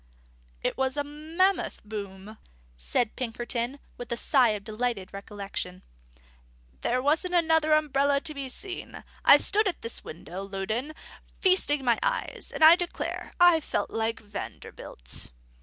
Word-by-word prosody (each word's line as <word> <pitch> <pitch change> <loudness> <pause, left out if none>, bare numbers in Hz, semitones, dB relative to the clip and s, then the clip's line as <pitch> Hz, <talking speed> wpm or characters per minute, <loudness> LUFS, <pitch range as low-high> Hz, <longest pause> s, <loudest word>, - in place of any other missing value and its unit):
"It - - -1
was 265 +1 0
a 290 - +1
mammoth 320 +6 0
boom," 205 0 -7 0.4
said 135 - 0
Pinkerton, 240 +1 -2 0.2
with 245 -1 -7
a 235 - 0
sigh 255 -1 +4
of 200 - -13
delighted 215 -3 -3
recollection. 195 -2 -6 1.0
"There 250 - +1
wasn't 320 +5 +2
another 320 -2 +4
umbrella 285 -2 +3
to 315 -1 -3
be 275 -2 -5
seen. 370 +8 -7 0.2
I - - +9
stood 420 +1 +2
at 370 - -3
this 230 - -5
window, 175 +3 -8
Loudon, 200 +9 -3 0.5
feasting 300 -7 +3
my 235 -2 +3
eyes; - - -2
and - - 0
I 320 +2 +10
declare, 350 -1 -4
I 350 -2 +7
felt 305 - -2
like 225 +1 -1
Vanderbilt." 200 - -7
260 Hz, 140 wpm, -27 LUFS, 215-315 Hz, 1.0 s, I